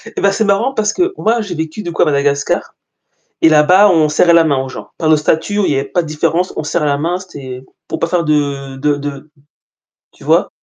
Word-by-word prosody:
Et - - -3
bah 200 - +3
c'est 220 - 0
marrant 205 +7 +1
parce 210 -3 0
que 365 +1 0
moi 230 +2 +1
j'ai 200 -5 -5
vécu 160 +6 -5
du 175 - -5
coup 165 - -1
à - - +5
Madagascar 140 -1 -1 0.7
et 165 - +6
là-bas, 180 +7 +5
on 160 -4 +3
serrait 170 +3 +3
la 170 -1 +5
main 145 -3 +1
aux 130 - -8
gens. - - -9
Par 160 -2 0
le 155 - +6
statut 160 +7 -1
où 205 - +2
il - - +1
y - - 0
avait 135 0 -1
pas 160 +5 -1
de 165 - -5
différence, 165 +4 -1
on - - -2
serre 150 +1 -1
la 140 -1 +1
main, 165 +5 -1
c'est 135 -9 -9 0.2
pour 160 - -4
pas - - 0
faire 170 0 0
de 140 -3 -1
de 145 +2 0
de 145 +1 -7 0.8
tu - - -20
vois? - - +2
160 Hz, 250 wpm, -15 LUFS, 145-185 Hz, 0.8 s, et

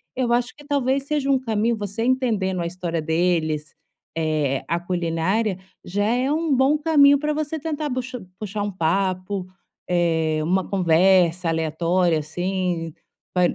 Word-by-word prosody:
Eu 245 -2 +1
acho 245 +1 0
que 290 -1 -15
talvez 275 -1 0
seja 285 -1 -1
um 270 - +4
caminho, 225 -1 0
você 205 +2 -3
entendendo 220 -8 0
a - - -2
história 170 -2 -3
deles, 160 -2 0 0.4
eh, 155 -4 0
a 170 0 0
culinária, 180 +4 -1 0.3
já 205 +3 -1
é 250 +5 +1
um 315 -1 +1
bom 270 +4 +3
caminho 285 -3 +5
para 300 0 -1
você 310 +1 -3
tentar 305 0 -3
buxa 255 -4 -4
puxar 205 -1 -3
um 205 - -2
papo, 185 +2 -1 0.4
eh, 165 -3 +1
uma 185 +3 0
conversa 180 -1 +3
aleatória, 165 +2 +1
assim, 175 +1 -2 0.4
pa 180 - +2
190 Hz, 145 wpm, -23 LUFS, 170-255 Hz, 0.4 s, caminho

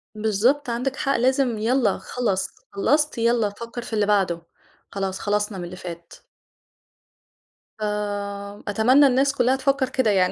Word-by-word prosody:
بالضبط، 220 +6 +1
عندِك 255 +3 -2
حق 275 -1 0
لازم 255 -2 +2
يالّا 240 +3 +1
خلَص، 200 -6 -2 0.2
خلّصت؟ 295 +10 +1
يالّا 230 -2 +2
فكّر 235 +3 -7
في 240 - -9
اللي 210 -2 +2
بعده، 190 -5 +1 0.5
خلاص 195 -1 -3
خلَصنا 205 0 -1
من 175 - -5
اللي 175 +1 -7
فات. 170 -2 -9 1.7
آمم، 205 -1 -4
أتمنى 245 +8 +5
الناس 275 +2 +2
كلّها 255 +1 +3
تفكّر 270 -1 +1
كده 245 -5 +1
يعني، 185 -2 +3
220 Hz, 140 wpm, -23 LUFS, 200-255 Hz, 1.7 s, أتمنى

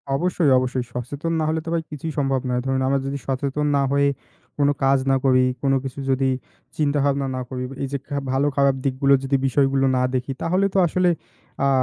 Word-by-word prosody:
অবশ্যই, 175 -1 +1
অবশ্যই 130 0 -1
সচেতন 145 +7 -3
না - - 0
হলে 160 0 0
তো - - -4
ভাই 165 -1 0
কিছুই 155 +2 -5
সম্ভব 135 -2 +1
না। - - 0
ধরুন 135 0 0
আমরা 135 0 +2
যদি 140 +1 -3
সচেতন 140 +2 -1
না 140 - +3
হয়ে 140 0 +3 0.5
কোন 145 -1 +3 0.2
কাজ 135 0 +4
না - - +4
করি, 130 -1 +5 0.2
কোন 135 -1 +2
কিছু 135 +1 -6
যদি 135 0 +2 0.5
চিন্তাভাবনা 140 -2 +1
না 130 - -3
করি, 130 -1 -4 0.2
এই - - -1
যে 140 - -1 0.3
ভালো-খারাপ 140 0 +2
দিকগুলো 135 +1 +3
যদি 135 +1 +1
বিষয়গুলো 135 0 +2
না - - +2
দেখি 130 +1 -1
তাহলে 185 +4 +1
তো - - 0
আসলে 180 +2 +2 0.6
আ - - +4
140 Hz, 195 wpm, -22 LUFS, 135-145 Hz, 0.6 s, করি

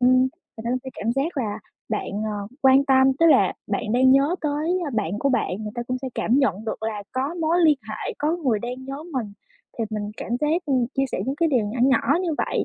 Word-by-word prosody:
ừm, 255 +1 +5
người 260 - +3 0.4
ta 235 - -1
cũng 255 - +1
sẽ 260 - -6
cảm 230 +2 -1
giác 290 +6 -1
là 215 -5 -2 0.3
bạn, 215 - -2
ờ, 205 -2 -4
quan 265 +1 +6
tâm, 265 -1 +5
tức 330 - +5
là 320 - +5
bạn - - -2
đang 260 +2 +5
nhớ 275 +5 +4
tới, 310 +4 0
a, - - -3
bạn 210 -4 -2
của 280 - +1
bạn, 255 -4 +1
người 210 - -5
ta 240 - -3
cũng 255 +1 -3
sẽ 265 - -2
cảm 245 +5 +2
nhận 215 -7 +1
được 220 - -4
là 220 -2 -3
có 270 +5 -2
mối 335 0 +1
liên 310 -4 +5
hệ, 215 - -4
có 310 +3 0
người 260 -11 0
đang 250 +4 -6
nhớ 275 +2 -6
mình. 230 -6 -3 0.5
Thì 230 - 0
mình 210 -1 -3
cảm - - -7
giác, 320 +4 +1
ừm, 260 -4 +2
chia 270 - +2
sẻ - - -1
những 270 +2 -2
cái 330 +1 +2
điều 245 -8 +2
nhỏ 220 +5 -4
nhỏ 265 +4 +3
như 345 -4 -1
vậy - - 0
260 Hz, 250 wpm, -23 LUFS, 225-290 Hz, 0.5 s, quan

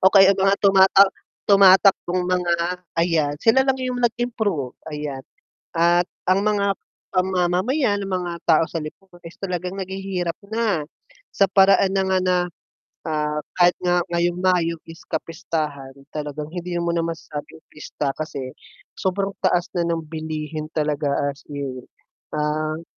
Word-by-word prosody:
o 190 - +7
kaya 195 -1 +8
ang 195 - -4
mga 195 +1 +4
tumatak 195 0 +6 0.4
tumatakbong 190 -2 +5
mga, 180 -1 +1 0.4
ayan 160 -4 +1
sila 225 - +4
lang 265 0 +2
yung 255 -1 -3
nag 240 -2 +1
improve, 215 - -2 0.2
ayan, 150 -3 -5 0.5
at 170 +1 +3 0.2
ang 190 +2 +3
mga 200 -2 +1 0.4
ang 185 0 +3
mamamayan, 200 - +1
ang 195 - -5
mga 180 -2 -2
tao 160 0 +4
sa 165 -2 -4
lipunan 175 +3 -12
is 165 - -12
talagang 180 -2 -3
naghihirap 190 -2 -3 0.2
na. 220 -8 0 0.5
Sa 195 - +3
paraan 195 0 +4
na 195 - +2
nga 190 0 +1
na, 185 0 +2 0.7
ah, 150 -1 -1 0.2
kahit 175 0 +5
nga 175 -1 +1
ngayong 175 0 +1
Mayo 180 -2 +1
is 165 +1 -12
kapistahan, 150 -4 -4 0.2
talagang 150 0 -5
hindi 175 0 -4
mo 170 0 0
na 170 - +1
masasabing 160 -1 -6
pista 145 -2 -4
kasi, 135 -4 -6 0.4
sobrang 195 +1 -2
taas 175 -2 +1
na 175 - -1
ng 165 -1 -1
bilihin 155 -1 -5
talaga 150 -1 0 0.2
as 140 - -18
in. 140 -3 -5 0.6
Ah 155 +2 -1
175 Hz, 145 wpm, -22 LUFS, 155-195 Hz, 0.7 s, kaya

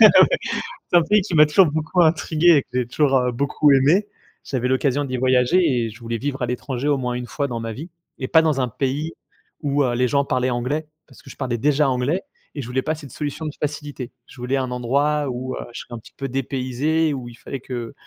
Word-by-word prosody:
Ouais. - - +12 0.8
C'est 175 - +5
un - - +6
pays 210 +4 +3
qui 185 - -6
m'a 150 0 +8
toujours 165 +5 +5
beaucoup 160 +4 +1
intrigué 160 0 +2
et - - +3
que - - -47
j'ai 125 -1 +1
toujours, 135 +1 +2
heu, 125 -1 +1
beaucoup 140 +4 +2
aimé. 150 +10 +4 0.4
J'avais 125 -2 -2
l'occasion 135 +2 +1
d'y 130 -2 -3
voyager 130 +7 +3 0.2
et 115 - -3
je 110 - -13
voulais 115 -1 -3
vivre 135 +2 -4
à - - +2
l'étranger 125 +2 -3
au 145 -1 +3
moins 125 -2 -2
1 125 0 -4
fois 140 +5 -2
dans 120 -3 -4
ma 115 0 -4
vie, 155 +10 -8 0.3
et 130 - -4
pas 160 - +5
dans 155 -4 +1
un 125 - +1
pays 140 +6 -2 0.5
où, 145 -1 +1
heu, 125 -2 0
les 125 +1 +2
gens 140 +2 +1
parlaient 130 -1 0
anglais, 130 +6 -2 0.2
parce - - -17
que 135 - -14
je - - -11
parlais 125 -3 -2
déjà 145 +3 +2
anglais 130 +8 0 0.3
et 145 - -3
je 120 - -7
voulais 130 +1 -1
pas 155 +4 -1
cette 145 -4 -11
solution 150 +3 -4
de 155 - -2
facilité. 145 -4 -4 0.2
Je - - -15
voulais 125 +2 -1
un 130 -2 -2
endroit 140 +4 +1
où, 130 +1 -4
heu, - - -6
je - - -6
serais - - -12
un - - -7
petit - - -17
peu 135 - -3
dépaysé 135 +5 0
et - - -1
où 125 -3 -6
il 120 - -13
fallait 135 - -6
que 120 -2 -6
135 Hz, 250 wpm, -22 LUFS, 125-150 Hz, 0.8 s, Ouais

